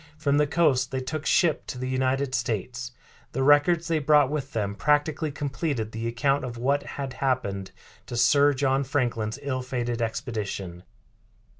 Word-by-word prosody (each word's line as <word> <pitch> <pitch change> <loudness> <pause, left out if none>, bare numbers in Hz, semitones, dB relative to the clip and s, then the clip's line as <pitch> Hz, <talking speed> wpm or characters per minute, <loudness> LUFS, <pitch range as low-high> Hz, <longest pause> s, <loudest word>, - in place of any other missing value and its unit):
From 145 -2 +1
the 150 - +3
coast 140 -6 +2
they 130 - -2
took 150 +4 -4
ship 170 -5 +2
to - - -5
the 130 +1 -3
United 130 +1 0
States. 120 +1 -2 0.4
The 135 - 0
records 145 +4 +4
they 165 -2 +1
brought 145 -1 +4
with 140 -2 -3
them 100 -3 -1
practically 150 +5 +1
completed 140 -5 -3
the 115 +1 -4
account 135 +5 +1
of 120 -2 -5
what 140 +4 +1 0.2
had 135 -2 -4
happened 100 -8 -1 0.4
to 120 - -5
Sir 145 +4 +5
John 135 0 +1
Franklin's 120 -4 -1
ill 130 -2 -2
fated 120 -2 -3
expedition. 105 -7 -4
130 Hz, 160 wpm, -26 LUFS, 120-145 Hz, 0.4 s, Sir